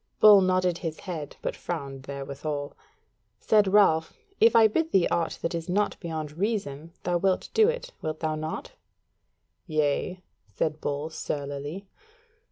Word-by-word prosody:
Bull 210 -2 +9
nodded 185 -2 +2
his 160 -3 -5
head, 160 -6 -6
but - - -2
frowned 140 -5 -5
therewithal. 140 +1 -5 0.6
Said 210 -2 +4
Ralph: 160 -6 +4 0.2
"If 230 +1 +6
I 225 -1 +8
bid 320 +9 -1
thee 190 -3 +4
aught 170 - -1
that 165 - -1
is 165 0 -4
not 205 +3 0
beyond 160 -2 -5
reason 170 -8 -2
thou 175 0 +1
wilt 190 0 +1
do 440 0 +5
it, - - -4
wilt 155 0 -3
thou 160 -1 -1
not?" 155 +1 -5 1.0
"Yea," 155 +4 0 0.2
said 150 - -2
Bull, 145 +2 -3
surlily. 145 +5 -4
165 Hz, 145 wpm, -27 LUFS, 150-195 Hz, 1.0 s, Bull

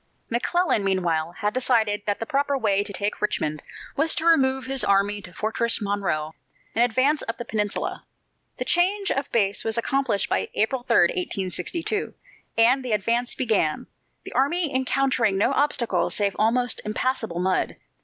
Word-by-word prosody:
McClellan, 285 - +1
meanwhile, 175 -4 0
had 210 +3 -2
decided 225 -5 +1
that 205 - 0
the 225 - -3
proper 280 +2 0
way 205 -5 +1
to 205 - -7
take 205 +2 -3
Richmond 155 -8 -1 0.3
was 315 +3 +2
to 320 - -2
remove 265 -5 +3
his 270 -1 0
army 200 +1 +2
to 180 - -12
Fortress 225 +4 0
Monroe 200 -7 -2 0.4
and 230 - +3
advance 260 +6 +2
up 230 - -3
the 240 - -6
peninsula. 210 -3 -2 0.5
The - - -3
change 390 +3 +2
of 275 - -2
base 205 -3 +1
was 225 0 -1
accomplished 245 -4 0
by - - -1
April 245 +4 +1
3, 240 -1 0
1862, 190 - -1 0.4
and 245 +4 +4
the 245 -3 -2
advance 230 +4 0
began, 210 -11 0 0.4
the - - -8
army 295 +3 +1
encountering 260 -5 +1
no 205 - +2
obstacle 275 -4 +1
save 200 -2 -1
almost 245 +3 +1
impassable 225 -3 -2
mud. 185 +1 0
230 Hz, 155 wpm, -24 LUFS, 200-265 Hz, 0.5 s, and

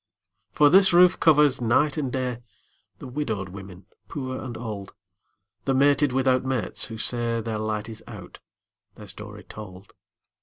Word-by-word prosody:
For 145 -1 +4
this 190 0 +6
roof 180 +1 +6
covers, 150 -4 +4
night 130 +5 +2
and 140 -5 -2
day, 125 -2 -2 0.6
The - - -10
widowed 120 -8 -3
women 95 0 -11 0.2
poor 130 -4 -5
and 120 -3 -6
old, 105 -4 -7 0.7
The 135 - +1
mated 145 +1 +3
without 130 0 +2
mates, 130 -3 -1
who 110 - -7
say 115 0 -1
Their 110 -1 -3
light 110 0 -3
is 110 -1 -9
out, 100 -6 -11 0.6
their 105 - -11
story 105 +1 -9
told. 100 -2 -11
120 Hz, 150 wpm, -25 LUFS, 105-135 Hz, 0.7 s, this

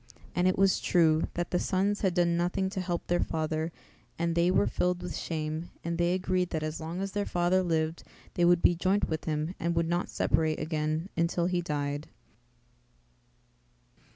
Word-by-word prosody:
And 180 +1 +2
it 185 - +2
was 195 0 +4
true, 160 -3 +3
that 175 0 -2
the 180 - +2
sons 200 +2 0
had 190 -3 +1
done 175 -1 +3
nothing 180 +2 0
to 195 -2 -2
help 175 -2 -3
their 175 0 +1
father 160 +1 -1 0.5
and 170 0 0
they 170 +1 +3
were 185 - +3
filled 180 0 0
with 180 - -4
shame 155 0 -3
and 170 0 -3
they 175 +1 +2
agreed 185 -1 0
that 160 -2 -2
as 155 0 -3
long 165 +3 -4
as 195 0 -3
their 205 0 -1
father 175 +1 +2
lived 160 -2 0 0.3
they 175 - +1
would 175 0 +4
be - - +6
joint 185 +4 +1
with 160 -1 -3
him 155 +2 -1
and 170 +1 -1
would 165 0 +1
not 175 +1 -1
separate 160 -1 +1
again 155 +2 -2
until 170 +1 +1
he 180 0 +1
died. 145 -2 -3
170 Hz, 185 wpm, -29 LUFS, 160-180 Hz, 0.5 s, be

